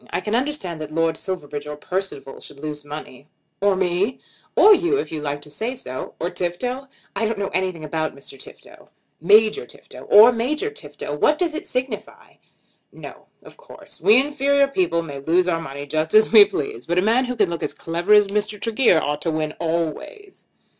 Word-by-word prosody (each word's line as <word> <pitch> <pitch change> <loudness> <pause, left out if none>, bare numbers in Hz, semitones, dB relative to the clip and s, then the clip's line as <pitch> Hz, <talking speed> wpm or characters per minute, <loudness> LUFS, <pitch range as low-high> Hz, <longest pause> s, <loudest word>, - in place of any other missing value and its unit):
I - - -2
can 210 +4 -4
understand 240 - -2
that 155 - -6
Lord 165 +1 0
Silverbridge 150 -6 -6
or 150 - -5
Percival 180 -4 -5
should 140 - -13
lose 150 0 -6
money." 145 -2 -9 0.3
"Or 200 -1 +3
me?" 190 +5 0 0.4
"Or 425 - +8
you, 360 +2 +2
if - - -4
you 155 -2 -4
like 145 0 -3
to 150 - -12
say 225 - -4
so." 130 - -7
"Or 175 +2 -2
Tifto?" 245 +10 -4 0.3
"I 225 - 0
don't 225 -1 -3
know 200 -1 -2
anything 185 -2 -2
about 155 0 -3
Mr. 140 0 -13
Tifto." - - -14 0.3
"Major 215 - +4
Tifto." - - -13
"Or 220 +4 +9
Major 295 - -2
Tifto; 435 - -8
what 300 - +2
does 335 -1 0
it 335 +4 -6
signify?" 255 -4 -5 0.5
"No; - - -12 0.2
of - - -15
course. - - -14
We 220 +4 +6
inferior 280 0 +2
people 175 -10 0
may 140 -4 -7
lose 170 +6 +1
our 165 -2 0
money 140 -2 -7
just 155 +5 -2
as 215 0 +5
we 215 -3 +9
please. 145 - -5
But 175 +1 -1
a 180 - +3
man 235 +5 +2
who 250 0 -4
can 205 -6 +1
look 170 - -4
as - - -2
clever 170 +4 -3
as 210 -1 +7
Mr. 210 +1 -2
Tregear 225 -5 +3
ought 150 -1 -3
to 165 - -1
win 155 -1 -2
always." 170 - -4
185 Hz, 195 wpm, -22 LUFS, 155-240 Hz, 0.5 s, Or